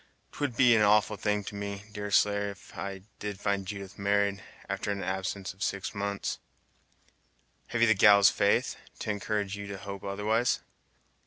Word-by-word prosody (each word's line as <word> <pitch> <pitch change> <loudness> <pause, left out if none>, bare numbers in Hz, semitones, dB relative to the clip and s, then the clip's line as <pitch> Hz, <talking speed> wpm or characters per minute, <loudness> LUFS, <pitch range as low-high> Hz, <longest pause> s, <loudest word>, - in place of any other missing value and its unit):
'T - - -13
would 140 -5 -1
be 125 -3 +6
an 110 - +4
awful 105 +1 +4
thing 105 +1 0
to 100 - -7
me, 100 0 -5
Deerslayer, 100 -1 +1 0.6
did 105 -1 -4
I - - -18
find 100 -2 -1
Judith 100 -1 -7
married, 100 0 +1 0.3
after - - -3
an 100 -1 -2
absence 95 +1 -3
of 95 - -22
six 100 0 -2
months!" 100 -1 -3 1.3
"Have 115 -1 -2
you 115 - +6
the 110 - +6
gal's 100 -2 +7
faith, - - +2 0.2
to 105 - -2
encourage 105 -1 -2
you 100 0 -7
to 100 -1 -5
hope 100 0 -7
otherwise?" 105 +4 +1
100 Hz, 165 wpm, -29 LUFS, 100-105 Hz, 1.3 s, gal's